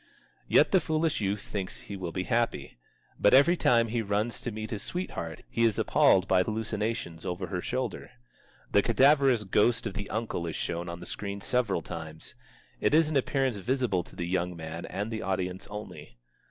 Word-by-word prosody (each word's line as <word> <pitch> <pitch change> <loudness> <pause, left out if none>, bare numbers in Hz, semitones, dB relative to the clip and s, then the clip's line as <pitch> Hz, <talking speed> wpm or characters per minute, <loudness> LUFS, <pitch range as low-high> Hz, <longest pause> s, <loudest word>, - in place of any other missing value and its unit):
Yet - - +5
the 190 - +6
foolish 155 -5 0
youth 100 0 -1
thinks 95 -3 -5
he 100 - -7
will 90 -3 -4
be 90 +2 -2
happy. 115 - -1 0.4
But 105 - +6
every 145 +6 +6
time 115 -8 +3
he 115 +1 0
runs 105 +2 -1
to - - -3
meet 110 0 -6
his 105 -3 -3
sweetheart 85 - -5
he 115 - 0
is 115 -3 +3
appalled 95 0 +4
by 95 -1 +4
hallucinations 110 -4 -3
over 90 +1 -3
her 90 0 -3
shoulder. 125 -2 -3 0.6
The - - +5
cadaverous 135 -4 +4
ghost 105 +4 +2
of - - -3
the 100 0 -5
uncle 110 -6 -2
is 80 - -4
shown 85 0 -3
on 85 0 -7
the - - -8
screen 100 +1 -4
several 105 -6 0
times. 80 -1 -6 0.5
It - - +3
is 160 -1 +4
an - - -2
appearance 135 -3 +1
visible 120 -3 0
to - - -15
the 85 - -3
young 90 0 -1
man 80 +1 -6
and 105 +3 -4
the 110 - -3
audience 95 -1 -2
only. 90 -11 -9
105 Hz, 190 wpm, -29 LUFS, 90-120 Hz, 0.6 s, the